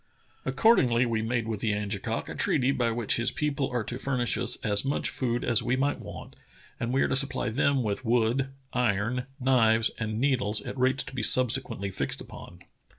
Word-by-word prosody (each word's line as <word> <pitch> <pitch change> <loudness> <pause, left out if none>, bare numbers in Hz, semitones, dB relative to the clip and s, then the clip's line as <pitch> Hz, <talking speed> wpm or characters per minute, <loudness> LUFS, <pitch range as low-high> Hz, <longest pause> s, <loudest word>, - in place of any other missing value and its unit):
Accord 230 +1 +4
ingly 120 -1 +2
we 115 -2 -1
made 115 0 -2
with 110 -2 -3
the 105 -1 0
Angekok 105 -1 -3
a - - -6
treaty 130 +1 +1
by 125 -3 0
which 115 -1 0
his 120 - +3
people 145 -3 -2
are 120 -2 -2
to 120 +3 -5
furnish 125 -3 0
as 105 -4 +2
much 140 +1 -1
food 120 -2 -2
as 120 -2 +3
we 125 - 0
might 140 +2 0
want, - - -10 0.4
and 115 - -2
we 135 +1 +2
are - - +1
to - - 0
supply 135 -3 +3
them 135 +4 +1
with 105 +3 -3
wood, 120 +3 +1 0.2
iron, 125 +1 0
knives, 115 -4 +3
and 110 -1 -3
needles 120 -6 +1
at - - -7
rates 130 +1 +1
to - - -10
be 130 - -3
subsequently 115 -4 +1
fixed - - -2
upon." - - -11
120 Hz, 195 wpm, -27 LUFS, 110-130 Hz, 0.4 s, Accord